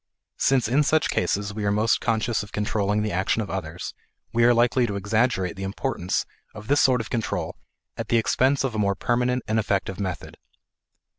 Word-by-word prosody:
Since 130 -4 +3
in 130 +6 +3
such 155 +2 +2
cases 100 +3 -1
we 105 0 -4
are 100 - +1
most 110 +2 +2
conscious 115 -1 0
of 105 - -10
controlling 105 0 0
the 105 - -2
action 95 +5 0
of 105 - -3
others, 85 -3 -5 0.4
we 115 0 +3
are 120 - +6
likely 120 +1 +3
to 100 - -3
exaggerate 100 -2 0
the 95 - -8
importance 95 -1 -2 0.3
of 105 +1 -10
this 145 - +4
sort 125 -3 +4
of 115 - -9
control 115 -3 -2 0.4
at - - -5
the 120 - +3
expense 130 +5 +2
of 135 -3 -1
a 110 - -2
more 100 -1 +1
permanent 125 +3 0
and 110 +1 +1
effective 95 -3 -1
method. 90 -5 -5
110 Hz, 195 wpm, -24 LUFS, 100-120 Hz, 0.4 s, are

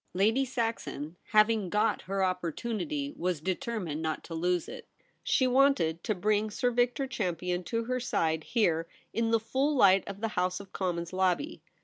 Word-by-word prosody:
Lady 220 +8 +3
Saxon, 225 - -3
having 215 -2 +3
got 210 +3 +1
her 195 0 +1
opportunity, 230 - -2
was 180 -2 -1
determined 185 -2 -3
not 160 -1 -2
to 165 - -8
lose 175 +1 0
it. - - -9 0.4
She 260 - +2
wanted 250 - +3
to 215 - 0
bring 210 +3 +1
Sir 245 +4 0
Victor 245 +3 +1
Champion 180 -7 -2
to 230 -1 -1
her 255 +2 -1
side 160 -9 0
here 170 -8 +1 0.3
in 230 0 +1
the 225 0 +3
full 270 +6 0
light 195 -6 +6
of 200 0 -6
the 225 +1 -1
House 180 -2 -1
of 200 -1 -12
Commons 175 -2 -2
lobby. 190 - 0
205 Hz, 165 wpm, -30 LUFS, 180-235 Hz, 0.4 s, light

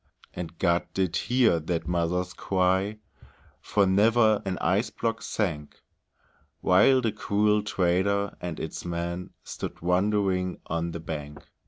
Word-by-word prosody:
And 85 -1 -7
God 85 +1 +1
did 95 -3 0
hear 120 -7 +3
that 85 +1 -3
mother's 90 +1 -1
cry, 95 +2 0 0.6
For 100 -1 +1
never 110 +2 +4
an 95 -1 -1
ice 95 +7 +1
block 115 0 -2
sank; 75 -9 -3 0.8
While 115 +8 +5
the 115 -3 0
cruel 105 0 +1
trader 100 +1 0
and 85 -3 -4
his 80 - -5
men 85 +1 -4
Stood - - -6
wondering 95 0 +1
on 85 +1 -2
the 85 - -6
bank. 75 -2 -7
95 Hz, 130 wpm, -27 LUFS, 85-105 Hz, 0.8 s, While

